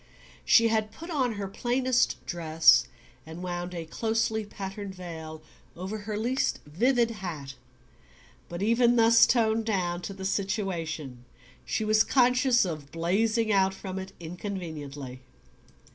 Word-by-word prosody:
She 230 -1 +5
had 220 -1 0
put 335 +9 -9
on 260 -7 0
her 200 -2 -4
plainest 250 +5 0
dress, 165 -2 +4 0.4
and 160 +3 -9
wound 175 0 -4
a 165 -1 -5
closely, 220 +4 -1
patterned 195 -1 -7
veil 160 -3 -8 0.3
over 190 +5 -5
her 210 0 -4
least 245 +5 0
vivid 235 - +2
hat; 165 -10 -6 1.0
but 175 +3 -4
even 235 +2 +4
thus 230 0 +6
toned 225 -2 +2
down 180 -5 -1
to 195 - -6
the 190 -1 -7
situation 170 - -3 0.4
she 220 - -1
was 215 0 +4
conscious 250 -2 +3
of 155 -5 -6
blazing 215 +7 +1
out 190 -1 +3
from 190 -1 -6
it 190 0 -7
inconveniently. 160 -7 -7
195 Hz, 130 wpm, -28 LUFS, 170-225 Hz, 1.0 s, thus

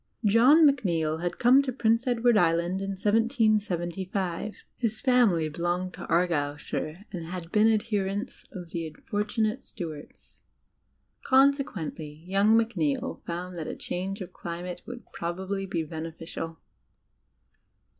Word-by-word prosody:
John 250 +10 +6
Macneill 170 - +2
had 175 0 -2
come 255 +3 +6
to 275 -2 -2
Prince 230 0 +1
Edward 240 -1 +3
Island 175 0 +2
in 195 0 -3
1775; 205 -4 0
his 220 -3 -2
family 235 - +3
belonged 175 +4 -2
to - - -8
Argyleshire 155 +1 -1
and 170 -4 -6
had 175 -1 -6
been 220 +1 +5
adherents 210 0 -2
of 180 -4 -8
the 165 -1 -3
unfortunate 210 - -2
Stuarts. 160 - -9 0.8
Consequently, 205 - +1
young 200 +4 +4
Macneill 190 -11 0
found 175 +1 -4
that 160 - -4
a - - -4
change 195 +3 -4
of 180 -1 -7
climate 175 +1 -6
would 245 -1 -8
probably 190 +3 -3
be 165 -3 -2
benefi 160 +1 -7
cial. 165 0 -6
190 Hz, 125 wpm, -27 LUFS, 170-225 Hz, 0.8 s, John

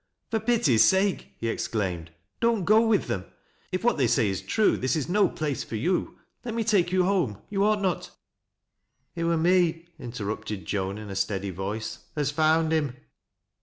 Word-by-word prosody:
"For 225 - +1
pity's 215 - +3
sake," 190 +1 +1
he 115 - -3
exclaimed, 95 -7 -2 0.2
" - - -50
don't 230 -5 +2
go 215 +2 +6
with 215 -3 +2
them 95 -1 -3 0.5
If 185 - -2
what 240 - +2
they 130 - +3
say 115 -2 +2
is 95 -2 -3
true, 220 -2 +2
this 130 0 0
is 155 - -1
no 195 +1 +3
place 150 -3 -3
for - - -7
you. 175 - -1 0.3
Let 235 -2 -4
irn> 230 - 0
take 200 -5 +2
you 185 0 +3
home. 180 - +1
You 200 -1 +1
ought 210 -1 +2
not 185 -2 -1 0.4
" - - -57
" - - -49
It 170 -1 -2
wur 170 0 +2
me," 170 0 +2
interrupted 110 -3 -5
Joan, 95 0 -2
in 105 -2 -8
a - - -5
steady 95 0 -1
voice, 100 +5 -4
" - - -37
af 145 -2 0
found 160 +1 +2
him." 150 -5 0
155 Hz, 200 wpm, -26 LUFS, -, 0.5 s, go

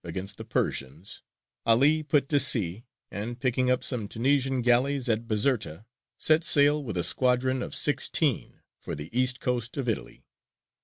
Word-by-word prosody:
against 95 +4 -5
the - - -6
Persians, 70 +8 -4 0.4
'Ali 140 +7 +3
put 145 -2 0
to 145 - +2
sea, 105 -4 +2 0.3
and, 115 +4 -6
picking 130 -1 -1
up 125 0 0
some 115 -6 -1
Tunisian 130 +3 -1
galleys 125 +2 +1
at 115 0 -1
Bizerta, 110 - -1 0.3
set 155 +1 +2
sail 145 -1 +4
with 110 -8 -6
a 85 - 0
squadron 130 0 +2
of - - -4
sixteen 145 -1 +1 0.2
for - - -7
the 80 +9 -10
east 130 0 +2
coast 125 -1 -3
of 135 -3 -4
Italy. 115 - -5
125 Hz, 155 wpm, -26 LUFS, 110-140 Hz, 0.4 s, sail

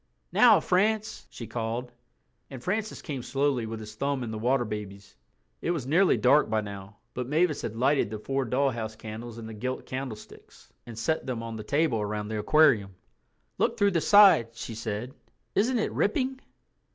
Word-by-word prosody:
"Now, - - +6
France," 215 +4 0
she 115 - -8
called. 115 +2 -4 0.6
And 130 -3 -9
Francis 215 +3 -2
came 140 -6 -4
slowly 135 -3 0
with 110 0 -5
his 110 0 -9
thumb 140 +3 -2
in 115 - -5
The 110 - -5
Water 120 +2 +1
Babies. 100 -2 -7 0.5
It - - -2
was 165 -8 -1
nearly 175 +7 +3
dark 150 -3 +4
by 110 0 +1
now, 100 0 -9 0.2
but 125 -1 -4
Mavis 155 +2 +1
had 110 - -5
lighted 135 -1 +2
the 110 - -5
four 135 +5 -2
dollhouse 115 -4 -1
candles 110 +1 -8
in 115 - -8
the 110 - -7
gilt 130 +4 -4
candlesticks 130 -4 -8
and 115 -2 -9
set 155 +7 -1
them 120 -3 -3
on 115 -1 -6
the 110 - -6
table 145 -6 +1
around 105 0 -3
the 110 -1 -2
aquarium. 105 -6 +3 0.6
"Look - - +1
through 200 0 +3
the 170 -3 +1
side," 200 - +7
she 115 - -6
said; 110 +3 -4 0.4
"isn't 240 +5 +2
it 220 - -1
ripping?" 260 +5 0
120 Hz, 180 wpm, -27 LUFS, 110-150 Hz, 0.6 s, side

